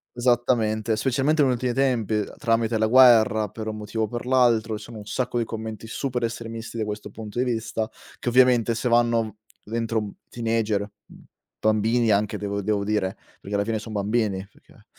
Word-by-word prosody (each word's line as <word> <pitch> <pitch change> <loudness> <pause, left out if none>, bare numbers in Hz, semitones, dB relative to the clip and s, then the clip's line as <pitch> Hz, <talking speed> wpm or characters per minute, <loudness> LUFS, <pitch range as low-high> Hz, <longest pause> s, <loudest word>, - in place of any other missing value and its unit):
Esattamente, 120 -3 +1
specialmente 135 +6 +1
negli 130 -3 +4
ultimi 125 0 -1
tempi, 125 -5 +1
ehm, 105 -1 -2
tramite 115 -1 +1
la 110 - +2
guerra 110 -3 +6
per 110 - -7
un 110 - -4
motivo 110 +1 -3
o - - 0
per 120 +3 -6
l'altro, 115 -4 +3
ci 105 - -10
sono 115 -1 -9
un 105 - -10
sacco 125 0 -1
di - - +1
commenti 110 0 -6
super 125 +1 -3
estremisti 115 0 -5
da 110 - -1
questo 105 0 -5
punto 110 +1 -7
di 125 - +2
vista 115 -2 -2 0.3
che - - -1
ovviamente 120 -2 +4
se 115 +3 -2
vanno 115 -2 +2 0.3
v 105 - -14
dentro 115 0 -1
un 105 -2 -2 0.2
teenager, 115 -3 0 0.3
mhmm, - - -16 0.4
bambini 110 +2 +2
anche 105 +1 +1
devo 100 0 -3
devo 100 0 0
dire, 100 -2 -1 0.2
perché 100 +1 -4
alla 100 - +2
fine 110 -1 -1
son 110 0 -8
bambini, 100 -2 -1
perché - - -22
115 Hz, 190 wpm, -24 LUFS, 110-120 Hz, 0.4 s, guerra